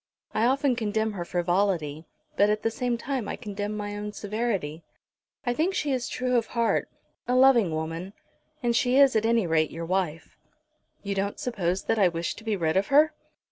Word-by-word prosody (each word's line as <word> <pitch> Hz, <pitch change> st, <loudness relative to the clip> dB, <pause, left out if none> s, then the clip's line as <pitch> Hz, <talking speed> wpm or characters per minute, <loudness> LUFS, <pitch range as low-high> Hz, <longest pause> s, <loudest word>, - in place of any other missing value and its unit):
I 225 Hz, -, +2 dB
often 270 Hz, 0 st, +2 dB
condemn 220 Hz, -1 st, -1 dB
her 190 Hz, -4 st, -4 dB
frivolity, 175 Hz, -3 st, 0 dB, 0.3 s
but 205 Hz, -5 st, +4 dB
at 210 Hz, 0 st, 0 dB
the 225 Hz, -, +1 dB
same 245 Hz, 0 st, -1 dB
time 255 Hz, -2 st, -3 dB
I -, -, -3 dB
condemn 205 Hz, -1 st, -5 dB
my 205 Hz, 0 st, -4 dB
own 210 Hz, 0 st, -5 dB
severity. 200 Hz, -8 st, -3 dB, 0.6 s
I 245 Hz, -, +1 dB
think 340 Hz, +9 st, 0 dB
she 300 Hz, -6 st, 0 dB
is 255 Hz, -2 st, -1 dB
true 250 Hz, -1 st, 0 dB
of 230 Hz, -2 st, 0 dB
heart, 235 Hz, -1 st, 0 dB, 0.4 s
a 250 Hz, -, +1 dB
loving 255 Hz, -7 st, +6 dB
woman. 165 Hz, +4 st, -4 dB, 0.5 s
And 235 Hz, -1 st, +2 dB
she 255 Hz, 0 st, +3 dB
is 275 Hz, -3 st, +6 dB
at 220 Hz, 0 st, +2 dB
any 230 Hz, -3 st, +3 dB
rate 160 Hz, -2 st, +2 dB
your 165 Hz, +1 st, -6 dB
wife." 175 Hz, -3 st, -2 dB, 0.6 s
"You 200 Hz, -1 st, -2 dB
don't 200 Hz, +1 st, -2 dB
suppose 190 Hz, -6 st, -1 dB
that 225 Hz, -, 0 dB
I 195 Hz, -, +6 dB
wish 170 Hz, 0 st, -2 dB
to 225 Hz, -, -11 dB
be 220 Hz, -2 st, 0 dB
rid 165 Hz, -2 st, 0 dB
of 195 Hz, -, +1 dB
her?" 300 Hz, +3 st, +5 dB
210 Hz, 195 wpm, -26 LUFS, 180-245 Hz, 0.6 s, loving